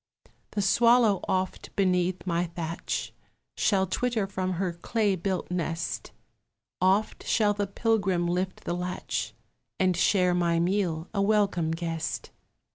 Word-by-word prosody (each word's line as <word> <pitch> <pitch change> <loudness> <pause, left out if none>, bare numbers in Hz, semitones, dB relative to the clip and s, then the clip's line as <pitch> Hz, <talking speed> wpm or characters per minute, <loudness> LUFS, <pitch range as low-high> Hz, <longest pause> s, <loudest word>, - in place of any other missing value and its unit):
The 205 - 0
swallow 230 0 +5
oft 185 0 -2
beneath 180 -2 +1
my 175 -1 0
thatch 165 0 -4 0.4
Shall 190 -2 +2
twitter 225 +3 0
from 185 -1 -2
her 180 0 -1
clay 205 +3 0
built 185 0 -3
nest; 170 -2 -3 0.7
Oft 195 +4 +2
shall 210 -2 +2
the 205 0 -2
pilgrim 195 -4 +1
lift 180 +2 -2
the - - -2
latch 180 +1 -3 0.4
And 185 -1 +3
share 180 0 +3
my 170 -1 +2
meal, 175 -2 0
a 200 - +1
welcome 200 -5 +2
guest. 165 -1 -3
185 Hz, 125 wpm, -27 LUFS, 175-200 Hz, 0.7 s, swallow